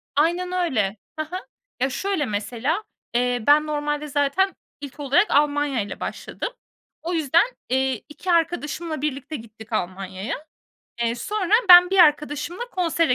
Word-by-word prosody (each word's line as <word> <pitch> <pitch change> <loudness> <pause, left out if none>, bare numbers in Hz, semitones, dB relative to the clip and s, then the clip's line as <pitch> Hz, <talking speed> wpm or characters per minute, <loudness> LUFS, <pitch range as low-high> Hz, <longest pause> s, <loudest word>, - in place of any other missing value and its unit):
Aynen 345 +4 +1
öyle. 230 - 0 0.2
Hı 310 - 0
hı. 355 - -8 0.4
Ya, 265 +2 +1
şöyle 385 0 -1
mesela, 240 - -2 0.3
eee, 245 -1 +1
ben 300 +1 +5
normalde 295 0 -2
zaten 290 +7 +1 0.3
ilk 285 +1 -9
olarak 290 +8 +2
Almanya'yla 285 -6 +1
başladım. - - -5 0.5
O 350 +2 -3
yüzden, 320 - +3 0.2
eee, 265 -2 0
2 350 +5 -4
arkadaşımla 325 -2 -1
birlikte 295 +1 -3
gittik 220 -2 -11
Almanya'ya. 190 +2 -3 0.7
Eee, 235 0 +1
sonra 405 - -3 0.2
ben 355 0 +10
bir 390 - +2
arkadaşımla 300 - +3
konsere 330 -6 +1
295 Hz, 130 wpm, -23 LUFS, 250-340 Hz, 0.7 s, ben